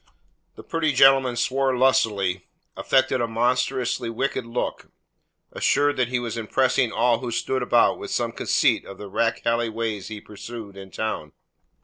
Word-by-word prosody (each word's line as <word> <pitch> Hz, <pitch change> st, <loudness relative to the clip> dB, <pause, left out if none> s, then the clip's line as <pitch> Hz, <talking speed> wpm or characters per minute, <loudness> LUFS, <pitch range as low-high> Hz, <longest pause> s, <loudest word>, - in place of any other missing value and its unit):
The -, -, -11 dB
pretty 160 Hz, -3 st, -1 dB
gentleman 135 Hz, -1 st, +5 dB
swore 130 Hz, +2 st, 0 dB
lustily, 105 Hz, -8 st, +1 dB, 0.3 s
affected 130 Hz, -1 st, +1 dB
a 120 Hz, -, 0 dB
monstrous 125 Hz, +2 st, 0 dB
wicked 120 Hz, +1 st, -3 dB
look, 115 Hz, +1 st, -4 dB, 0.6 s
assured 145 Hz, 0 st, +2 dB
that 125 Hz, -2 st, +1 dB
he 130 Hz, +1 st, -1 dB
was 120 Hz, -2 st, -4 dB
impressing 125 Hz, +1 st, +1 dB
all 115 Hz, 0 st, +2 dB
who 125 Hz, -1 st, -5 dB
stood 130 Hz, +3 st, -1 dB
about 120 Hz, -1 st, +3 dB
with -, -, -7 dB
some -, -, -1 dB
conceit -, -, +1 dB
of 95 Hz, -, -11 dB
the 105 Hz, -, -8 dB
rakehelly 115 Hz, +1 st, 0 dB
ways 110 Hz, -3 st, -3 dB
he 110 Hz, -1 st, -7 dB
pursued 105 Hz, 0 st, -9 dB
in 95 Hz, -1 st, -10 dB
town. 110 Hz, -8 st, -4 dB
120 Hz, 150 wpm, -24 LUFS, 110-130 Hz, 0.6 s, gentleman